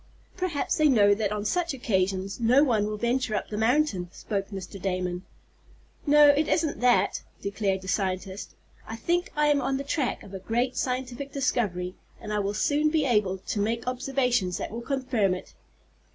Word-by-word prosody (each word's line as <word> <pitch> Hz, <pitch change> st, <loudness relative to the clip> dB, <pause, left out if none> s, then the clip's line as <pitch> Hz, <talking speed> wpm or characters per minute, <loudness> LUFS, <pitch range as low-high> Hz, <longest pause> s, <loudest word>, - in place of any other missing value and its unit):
"Perhaps 360 Hz, -6 st, -1 dB
they 310 Hz, -1 st, +4 dB
know 205 Hz, -6 st, +5 dB
that 205 Hz, -1 st, -1 dB
on 210 Hz, 0 st, -3 dB
such 335 Hz, +4 st, 0 dB
occasions 195 Hz, -4 st, -1 dB
no 245 Hz, +5 st, +5 dB
one 220 Hz, -7 st, +2 dB
will 210 Hz, 0 st, -3 dB
venture 235 Hz, 0 st, 0 dB
up -, -, -3 dB
the 210 Hz, -, -4 dB
mountain," 220 Hz, -, +1 dB
spoke 195 Hz, -1 st, -4 dB
Mr. 195 Hz, -1 st, -7 dB
Damon. 180 Hz, -1 st, -2 dB, 0.9 s
"No, 295 Hz, 0 st, +7 dB
it 290 Hz, +2 st, +3 dB
isn't 315 Hz, -3 st, 0 dB
that," 240 Hz, -6 st, +3 dB, 0.2 s
declared 200 Hz, -1 st, -1 dB
the -, -, -9 dB
scientist. 190 Hz, 0 st, -2 dB, 0.3 s
"I 225 Hz, -, -5 dB
think 345 Hz, +9 st, -1 dB
I 300 Hz, 0 st, +2 dB
am 295 Hz, -1 st, +3 dB
on 270 Hz, -, 0 dB
the 275 Hz, -, -4 dB
track 280 Hz, -2 st, -1 dB
of 200 Hz, -, -12 dB
a 190 Hz, -, -5 dB
great 240 Hz, +6 st, -1 dB
scientific 255 Hz, +1 st, -3 dB
discovery, 210 Hz, -10 st, -1 dB, 0.3 s
and 210 Hz, -, -5 dB
I 210 Hz, -, +1 dB
will 200 Hz, 0 st, -1 dB
soon 295 Hz, +7 st, +2 dB
be 305 Hz, -2 st, +1 dB
able 210 Hz, -6 st, +2 dB
to 200 Hz, +2 st, -4 dB
make 225 Hz, +3 st, -1 dB
observations 250 Hz, -6 st, 0 dB
that -, -, -5 dB
will 230 Hz, +2 st, -5 dB
confirm 245 Hz, -7 st, 0 dB
it." 185 Hz, -, -10 dB
225 Hz, 180 wpm, -27 LUFS, 195-275 Hz, 0.9 s, No